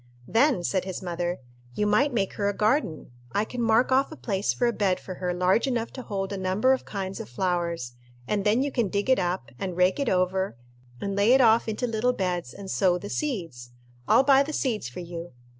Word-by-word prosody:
"Then," 245 -5 +3
said 185 +1 0
his 190 0 -5
mother, 175 0 -2 0.4
"you 210 - 0
might 215 +8 +3
make 200 -6 -1
her 200 -1 0
a 205 - -3
garden. 215 - 0 0.2
I 210 - +1
can 245 +2 -5
mark 230 +3 +3
off 270 +3 +3
a - - -7
place 200 -8 -1
for 245 - 0
a 235 - +2
bed 195 -4 +1
for 185 - -7
her 180 0 -3
large 180 +8 +2
enough 235 -3 -2
to 260 - -6
hold 195 -4 -4
a - - -3
number 190 +8 +2
of 260 - -3
kinds 195 -2 -5
of 105 - -7
flowers, 170 -3 -2 0.3
and 205 -2 0
then 215 +5 +3
you 285 - -2
can 235 -6 +1
dig 205 +7 0
it 260 - +4
up, 175 -7 -2
and 185 -3 -4
rake 180 +4 +3
it 280 -4 0
over, 185 -5 0 0.4
and 200 -1 -3
lay 205 +5 +4
it 265 - +6
off 230 -1 +4
into 220 +3 -2
little 235 +1 +1
beds, 180 - -2
and 195 -1 -8
sow 180 -3 +2
the 205 +3 -7
seeds. 165 - -4 0.3
I'll 260 - +5
buy 270 0 +6
the 300 +2 -2
seeds 225 - -1
for 125 - -7
you. 170 -1 -7
200 Hz, 225 wpm, -26 LUFS, 180-235 Hz, 0.4 s, it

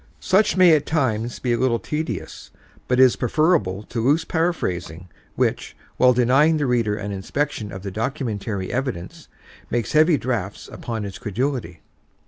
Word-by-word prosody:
Such 190 +1 +2
may 180 -3 +7
at 150 -1 -1
times 120 -7 0
be 120 -2 -1
a 120 - 0
little 125 -3 +2
tedious 150 - -5 0.4
but 125 0 +1
is 130 -2 +6
preferable 125 - +1
to 115 +1 -4
loose 150 +6 +2
paraphrasing 90 - -2 0.3
which, - - -1 0.2
while 125 0 +6
denying 130 +6 +3
the 145 - 0
reader 115 -5 +1
an 105 0 -5
inspection 105 +2 -3
of 95 0 -8
the 100 - -5
documentary 110 -4 -3
evidence, 125 -9 -4 0.4
makes 120 -3 -1
heavy 155 +1 +4
drafts 110 -7 -3
upon 115 -3 -5
his 100 +3 -7
credulity. 120 - -3
120 Hz, 150 wpm, -22 LUFS, 105-145 Hz, 0.4 s, may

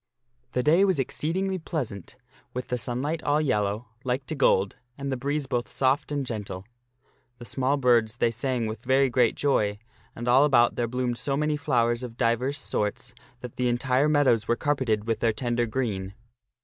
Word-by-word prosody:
The 125 - 0
day 165 +7 +5
was 190 -4 +3
exceedingly 185 +8 -1
pleasant 125 - -5 0.4
with 125 - -4
the 125 - -1
sunlight 130 +8 -2
all 145 +1 +2
yellow, 105 -5 -1
like 130 +1 -1
to 160 - -4
gold, 100 -9 +2 0.2
and 140 0 -4
the - - 0
breeze 140 +3 -2
both 120 -2 -2
soft 135 +2 +1
and 145 -2 -1
gentle. 105 -5 -5 0.7
The 120 - -10
small 135 +3 0
birds 120 -4 +2
they 115 - +2
sang 120 0 -1
with 110 +1 -5
very 130 +1 +3
great 120 -2 +3
joy, 105 -8 +1 0.4
and 120 +1 -6
all 130 +3 +6
about 120 -5 +4
there 120 - -1
bloomed 125 0 -2
so 140 -1 0
many 150 0 +1
flowers 120 -4 +1
of 120 -2 -7
divers 125 +4 +1
sorts 120 -1 -2 0.3
that 125 -2 -9
the 125 -1 +1
entire 130 +4 +2
meadows 135 -8 +3
were 120 - +2
carpeted 125 -7 0
with 115 -1 -1
their 115 -2 +2
tender 120 0 -1
green. 100 -5 -3
125 Hz, 180 wpm, -26 LUFS, 115-140 Hz, 0.7 s, all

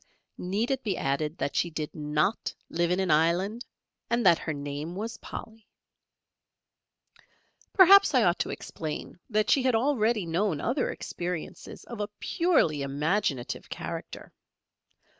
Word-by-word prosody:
Need 205 +8 -1
it 265 -1 0
be 205 -4 -1
added 150 +3 -1
that 140 - -2
she 175 - +1
did 155 -2 -5
not 150 +6 -1 0.2
live 170 0 +1
in 180 +1 +1
an 190 -1 +1
island 175 +9 +2 0.5
and 235 -1 +1
that 170 -3 +6
her 160 - -3
name 145 +3 -5
was 220 +4 -4
"Polly." 220 -1 -9 2.1
Perhaps 390 -4 +7
I 250 - +5
ought 175 -2 +2
to - - -1
explain 160 +2 -6
that 215 -2 +1
she 275 - +5
had 255 -2 +2
already 225 -5 +2
known 170 -1 0
other 250 - 0
experiences 175 -2 -6
of 235 -3 -9
a 205 0 -2
purely 315 - +2
imaginative 140 0 -1
character. - - -7
185 Hz, 140 wpm, -28 LUFS, 155-230 Hz, 2.1 s, Perhaps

